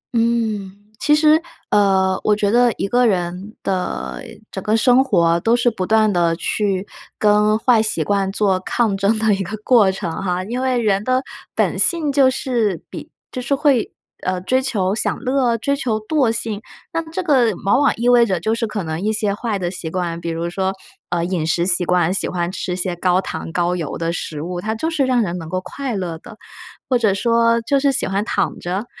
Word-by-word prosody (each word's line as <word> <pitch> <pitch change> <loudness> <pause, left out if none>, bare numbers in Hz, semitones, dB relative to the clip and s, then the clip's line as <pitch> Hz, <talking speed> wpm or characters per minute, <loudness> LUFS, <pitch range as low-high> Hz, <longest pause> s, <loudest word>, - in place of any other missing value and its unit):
嗯， 225 -4 0 0.3
其 300 0 +3
实， 305 +1 +4 0.3
呃， 190 -2 +3
我 210 - +3
觉 205 -1 0
得 240 +1 +4
一 - - -1
个 245 +2 +3
人 185 +2 -2
的 65 - -3 0.3
整 190 - -6
个 215 +1 +2
生 250 +3 +4
活 170 -8 +2
都 225 +6 +2
是 240 0 +2
不 185 -4 -4
断 215 -1 +3
地 170 -2 +2
去 195 +1 -1 0.3
跟 210 0 +3
坏 230 -1 +3
习 215 -7 0
惯 195 +1 0
做 195 -2 +1
抗 210 +1 0
争 200 +3 +1
的 215 -1 +2
一 195 - -1
个 200 +3 -4
过 220 -6 +5
程 190 -3 -4
哈。 180 -1 -1
因 240 +6 -4
为 260 -1 +1
人 205 -3 +1
的 255 +3 +1 0.3
本 - - 0
性 325 -5 +2
就 270 -2 +4
是 235 -8 -1
比 - - -8 0.2
就 255 - -4
是 265 +3 0
会， 275 -5 +2 0.3
呃， 185 0 -1
追 255 +8 +1
求 195 -7 0
享 215 - 0
乐， 255 -3 +1
追 280 +6 0
求 235 -6 -1
惰 255 +1 +1
性。 220 -2 -2 0.3
那 330 - 0
这 365 +3 -3
个 260 -8 +3
往 200 +6 +3
往 285 - +4
意 235 +2 -2
味 245 -1 +6
着 190 -4 0
就 220 +6 0
是 230 0 -1
可 210 -3 -4
能 160 +1 -4
一 215 +2 0
些 210 -2 0
坏 215 -1 -2
的 175 -1 -3
习 170 -3 -5
惯， 170 -1 -3
比 170 - -4
如 165 +1 -3
说， 190 +1 -1 0.4
呃， 170 -1 -1
饮 175 -3 -2
食 170 +1 +1
习 180 -1 +3
惯， 180 0 +2
喜 195 - 0
欢 175 -1 -2
吃 185 -1 -4
一 - - -2
些 180 -1 -2
高 180 +1 +2
糖 165 - -5
高 175 +1 0
油 165 -5 -4
的 165 0 -2
食 155 -3 -5
物， 175 +1 -4
它 220 +2 -2
就 320 +9 -2
是 290 -4 +1
让 250 -3 +2
人 180 -1 -3
能 160 -1 -8
够 185 - -1
快 265 +2 -5
乐 170 -4 -4
的。 220 - -13 0.5
或 250 -2 +2
者 215 -4 +3
说 230 +2 +2
就 280 +4 +1
是 280 0 +2
喜 - - 0
欢 195 +2 -1
躺 - - -1
着， 190 +6 -3
210 Hz, 230 characters per minute, -19 LUFS, 180-240 Hz, 0.5 s, 味